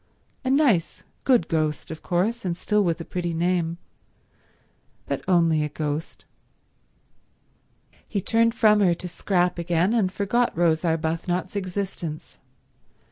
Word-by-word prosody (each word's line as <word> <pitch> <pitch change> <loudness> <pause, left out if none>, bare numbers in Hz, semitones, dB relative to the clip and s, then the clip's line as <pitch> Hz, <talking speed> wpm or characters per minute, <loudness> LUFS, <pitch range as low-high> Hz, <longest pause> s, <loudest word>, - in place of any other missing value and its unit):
A 260 - -1
nice 260 - +2 0.2
good 245 -11 +4
ghost, 155 -1 -1
of 160 - -7
course, 210 +7 0
and 175 -3 -2
still 210 +2 +1
with 170 -2 0
a 165 - -6
pretty 175 -2 -3
name, 170 -1 0 1.3
but - - -3
only 165 -4 +3
a 150 - -2
ghost. 150 +1 -4 1.8
He 205 - -2
turned 230 +4 +2
from 215 -2 +5
her 180 -4 +3
to 180 - -7
Scrap 180 0 0
again, 170 +4 +1
and 205 -6 +2
forgot 205 +2 0
Rose 165 -1 +2
Arbuthnot's 165 +3 -1
existence. 185 -5 -5
175 Hz, 130 wpm, -24 LUFS, 165-205 Hz, 1.8 s, from